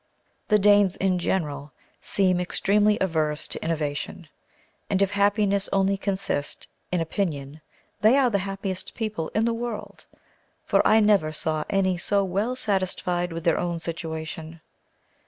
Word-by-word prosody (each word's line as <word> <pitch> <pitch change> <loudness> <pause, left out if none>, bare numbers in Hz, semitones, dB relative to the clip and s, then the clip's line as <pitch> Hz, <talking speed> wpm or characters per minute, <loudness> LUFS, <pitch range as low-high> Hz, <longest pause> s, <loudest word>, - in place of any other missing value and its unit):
The 210 - +5
Danes, 205 -2 +4
in 185 -1 +1
general, 145 -6 -2 0.3
seem 185 -2 +2
extremely 210 +3 +2
averse 155 -4 0
to - - -5
innovation, 150 0 -3 0.6
and 190 - +1
if 195 0 +2
happiness 200 -1 +2
only 195 0 +2
consist 190 -7 -3 0.2
in 180 -2 +1
opinion, 155 -4 -3 0.4
they 220 +6 +5
are 260 -3 +3
the 200 - +2
happiest 195 -1 -5
people 215 -8 -3
in 220 - +2
the 235 - +1
world; 230 -2 -6 0.6
for - - +3
I 220 +1 +5
never 205 -7 +3
saw 155 0 -2
any 190 -2 +1
so 200 +2 +2
well 200 +7 -1
satisfied 185 -5 -1
with 165 0 -5
their 170 - +2
own 175 -1 -2
situation. 160 -1 -6
190 Hz, 140 wpm, -25 LUFS, 165-205 Hz, 0.6 s, The